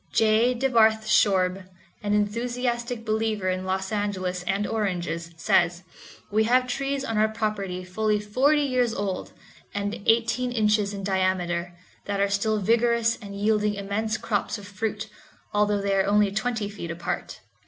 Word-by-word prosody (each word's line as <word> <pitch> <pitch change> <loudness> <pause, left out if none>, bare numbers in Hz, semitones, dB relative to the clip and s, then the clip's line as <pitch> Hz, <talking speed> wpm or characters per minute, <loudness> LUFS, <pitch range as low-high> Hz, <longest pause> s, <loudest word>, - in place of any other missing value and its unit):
J. 225 +3 +3
DeBarth 225 -4 +3
Shorb, 190 -3 +2 0.3
an 205 -1 0
enthusiastic 235 +2 -1
believer 215 -3 0
in 185 0 -2
Los 190 +1 -2
Angeles 190 -4 -2
and 200 +2 0
oranges, 175 -6 -2
says, 175 +2 +2 0.5
"We 215 +1 +3
have 250 +2 +3
trees 275 +2 -2
on 225 -3 -1
our 215 - +4
property 210 -4 -3
fully 210 +3 0
forty 270 +9 +2
years 250 -4 +1
old, 195 -2 -3 0.4
and 205 +1 -3
eighteen 235 +2 +2
inches 210 -3 +2
in 195 - -6
diameter, 180 -2 0 0.3
that 200 -1 -2
are 200 0 +2
still 215 +2 +1
vigorous 230 +2 +2
and 200 -1 -8
yielding 210 0 +1
immense 205 +2 -2
crops 205 -3 -2
of 200 -1 -11
fruit, 215 +2 -3 0.5
although 210 0 +2
they 200 0 0
are 195 0 +2
only 205 0 +3
twenty 220 0 -1
feet 200 -5 -7
apart." 170 +1 -4
210 Hz, 150 wpm, -25 LUFS, 195-225 Hz, 0.5 s, our